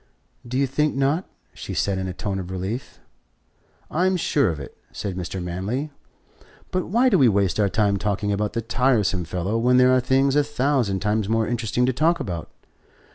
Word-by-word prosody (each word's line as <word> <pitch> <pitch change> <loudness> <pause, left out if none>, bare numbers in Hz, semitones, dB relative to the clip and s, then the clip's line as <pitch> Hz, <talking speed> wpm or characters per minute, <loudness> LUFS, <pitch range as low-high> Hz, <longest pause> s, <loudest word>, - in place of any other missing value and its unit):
"Do 125 +2 -2
you 140 - +3
think 150 +3 0
not?" 140 +7 0 0.2
she - - -7
said 95 -1 0
in 95 - -3
a - - -3
tone 95 0 -3
of 90 -1 -6
relief. 95 +7 -5 0.9
"I'm 185 +3 +2
sure 145 -7 +2
of 80 -3 -4
it," 70 - -9 0.2
said 100 -3 -5
Mr. 90 +1 -4
Manley. 100 - -3 0.8
"But 185 -1 -1
why 235 +8 +3
do 200 -8 +4
we 130 - +6
waste 100 -1 +1
our 100 -1 +3
time 100 +1 +1
talking 105 +1 -1
about 105 +1 -1
the 115 - -2
tiresome 115 -7 +1
fellow 90 +7 -2
when 125 +2 +3
there 125 0 +5
are - - +4
things 135 +2 +2
a 145 - +4
thousand 130 -9 0
times 105 0 0
more 115 0 +1
interesting 120 0 0
to 130 - +1
talk 165 +6 +2
about? 85 -4 -5
115 Hz, 190 wpm, -23 LUFS, 95-135 Hz, 0.9 s, we